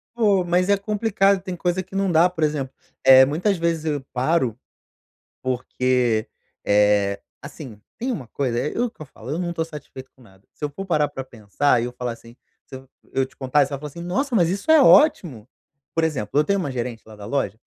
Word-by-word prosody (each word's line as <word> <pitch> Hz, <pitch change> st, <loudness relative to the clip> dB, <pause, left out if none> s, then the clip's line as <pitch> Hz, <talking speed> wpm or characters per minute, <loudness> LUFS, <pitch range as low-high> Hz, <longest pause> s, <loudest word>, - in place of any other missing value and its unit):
Pô, 205 Hz, -5 st, +3 dB
mas 180 Hz, +2 st, +1 dB
é 200 Hz, -, +4 dB
complicado 200 Hz, -2 st, +1 dB
tem 185 Hz, -2 st, -5 dB
coisa 175 Hz, +2 st, -1 dB
que 185 Hz, +1 st, -12 dB
não 195 Hz, -1 st, +1 dB
dá, 170 Hz, +2 st, +5 dB
por 170 Hz, -3 st, -4 dB
exemplo, 140 Hz, -3 st, -1 dB, 0.3 s
eh, 130 Hz, 0 st, +8 dB
muitas 180 Hz, +8 st, 0 dB
vezes 165 Hz, -1 st, -1 dB
eu 150 Hz, -2 st, -1 dB
paro, 130 Hz, -2 st, +1 dB, 0.9 s
porque, 125 Hz, -2 st, 0 dB, 0.4 s
eh, 100 Hz, -1 st, +3 dB, 0.2 s
assim, 140 Hz, -6 st, -10 dB, 0.2 s
tem 255 Hz, +3 st, -2 dB
uma 135 Hz, -, -5 dB
coisa, 120 Hz, -2 st, -2 dB
é 150 Hz, -, -2 dB
é -, -, -3 dB
o 245 Hz, -, 0 dB
que 220 Hz, -, -20 dB
eu -, -, -6 dB
falando, 130 Hz, +2 st, -7 dB
eu -, -, -3 dB
não 170 Hz, -, -3 dB
tô 165 Hz, -, -1 dB
satisfeito 150 Hz, -4 st, -11 dB
com 130 Hz, -, -24 dB
nada. 95 Hz, -4 st, -21 dB
Se -, -, -14 dB
eu -, -, -3 dB
for 195 Hz, +7 st, -7 dB
parar 155 Hz, -5 st, +1 dB
pra 135 Hz, -, -7 dB
pensar 120 Hz, +1 st, 0 dB
e -, -, -1 dB
eu 125 Hz, -, -6 dB
falar, 125 Hz, -1 st, -4 dB
assim, 115 Hz, +1 st, -13 dB, 0.3 s
se -, -, -11 dB
eu 130 Hz, 0 st, -12 dB, 0.2 s
eu 135 Hz, -, +1 dB
te 130 Hz, -, -20 dB
contar 135 Hz, +2 st, +2 dB
e -, -, -1 dB
você -, -, -10 dB
vai 140 Hz, -, -5 dB
falar 150 Hz, -, -6 dB
assim: 160 Hz, +4 st, -10 dB
"Nossa, 235 Hz, +9 st, -1 dB
mas 170 Hz, -4 st, +3 dB
isso 200 Hz, -, -4 dB
é 315 Hz, -2 st, +7 dB
ótimo!" 185 Hz, -, +4 dB, 0.5 s
Por 165 Hz, -, +1 dB
exemplo, 140 Hz, -7 st, -2 dB
eu 150 Hz, -, +5 dB
tenho 200 Hz, +5 st, 0 dB
uma 145 Hz, -6 st, -3 dB
gerente 120 Hz, -2 st, -5 dB
lá 110 Hz, -, -13 dB
da 105 Hz, -1 st, -10 dB
loja 110 Hz, -3 st, -2 dB
145 Hz, 230 wpm, -22 LUFS, 125-180 Hz, 0.9 s, eh